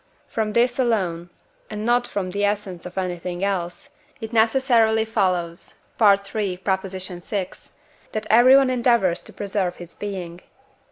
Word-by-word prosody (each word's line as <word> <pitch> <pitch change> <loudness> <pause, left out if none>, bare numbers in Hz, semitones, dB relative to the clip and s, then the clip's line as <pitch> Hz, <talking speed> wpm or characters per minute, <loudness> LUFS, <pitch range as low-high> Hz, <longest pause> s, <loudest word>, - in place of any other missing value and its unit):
from 215 -1 -2
this 245 +3 +2
alone, 185 -9 0 0.4
and 215 0 -5
not 245 +1 +2
from 185 -2 -3
the 200 +2 -2
essence 200 -4 -2
of 180 - -13
anything 180 0 -3
else, 190 +4 -2 0.3
it 225 -1 -7
necessarily 225 -1 +3
follows 180 -6 -1 0.3
(III. 200 -1 +3
vi.) 190 0 -3 0.6
that 215 0 -3
everyone 255 +3 +6
endeavours 235 -8 +2
to - - -7
preserve 195 -3 -2
his 175 -1 -10
being. 185 -4 -6
200 Hz, 125 wpm, -23 LUFS, 180-225 Hz, 0.6 s, everyone